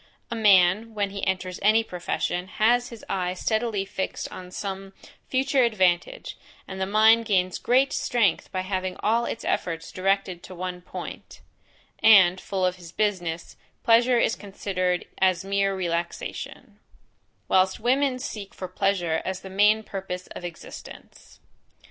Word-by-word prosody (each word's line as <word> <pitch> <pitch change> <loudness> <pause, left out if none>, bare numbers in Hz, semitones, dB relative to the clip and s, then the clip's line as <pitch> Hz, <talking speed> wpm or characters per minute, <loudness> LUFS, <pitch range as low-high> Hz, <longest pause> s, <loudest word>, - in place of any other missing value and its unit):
A - - -1
man, 210 +1 +4
when 200 -1 -1
he 200 0 -6
enters 185 -1 -2
any 215 +3 +4
profession, 180 -1 -3
has 240 +5 +2
his 230 -2 -11
eye 180 -1 -1
steadily 220 0 -1
fixed 195 -1 -4
on 180 -1 -9
some 195 +1 -6 0.4
future 270 +1 +2
advantage 200 - 0 0.3
(and 190 0 -6
the 190 - 0
mind 220 +3 +5
gains 185 -3 +1
great 260 +3 +2
strength 220 -8 +1
by 185 - -2
having 185 -1 -3
all 230 +2 +2
its 230 - -5
efforts 165 -1 -2
directed 190 -1 0
to 185 - -11
one 180 0 -5
point) - - -9 0.6
and, 190 -4 +7
full 190 -2 -1
of 180 0 0
his 175 -2 -12
business, 175 -5 -2 0.3
pleasure 240 +2 +5
is 225 - +2
considered 185 -3 -2
as 185 -1 +2
mere 195 0 +1
relaxation; 170 -2 -4 0.7
whilst 190 0 +3
women 260 +3 +2
seek 210 -5 -7
for 185 - -5
pleasure 175 -5 0
as 190 0 -4
the 190 - -10
main 210 +3 +4
purpose 190 -3 -6
of - - -8
existence. 175 -2 -11
195 Hz, 145 wpm, -25 LUFS, 185-220 Hz, 0.7 s, and